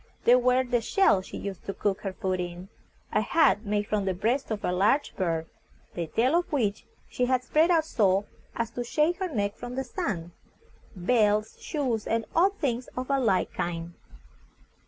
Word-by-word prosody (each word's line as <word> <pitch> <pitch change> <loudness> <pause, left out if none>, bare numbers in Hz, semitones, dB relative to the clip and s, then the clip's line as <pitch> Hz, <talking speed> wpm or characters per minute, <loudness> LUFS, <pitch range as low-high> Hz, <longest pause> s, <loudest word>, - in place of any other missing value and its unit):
There 245 +1 +6
were 250 +1 +3
the 245 -2 0
shells 220 - +3
she - - -7
used 195 -3 -6
to 195 - -4
cook 200 -2 -1
her 195 - -3
food 185 -2 -2
in; 175 +1 -6 0.4
a - - +3
hat 270 - +3
made 205 0 0
from 205 -1 -1
the 190 -1 0
breast 240 +8 0
of 215 -2 -3
a - - +1
large 205 +11 +2
bird, 165 -4 -1 0.5
the 170 -2 -3
tail 245 - +1
of 350 - -6
which 220 -9 -1 0.2
she 250 - -1
had 255 -1 +1
spread 310 +6 +3
out 330 -3 +3
so 200 -8 +2 0.3
as 230 -1 -2
to 245 - -4
shade 305 +8 +1
her 380 -2 -2
neck 200 -4 -1
from 245 0 -7
the 265 - -1
sun; 190 - -4 0.6
belts, 210 +2 +1
shoes, 255 -9 -2
and 225 -1 0
odd 385 +4 +3
things 250 - -1
of 255 +2 -3
a 275 - +3
like 205 -7 +1
kind. 170 0 -3
225 Hz, 190 wpm, -27 LUFS, 195-260 Hz, 0.6 s, There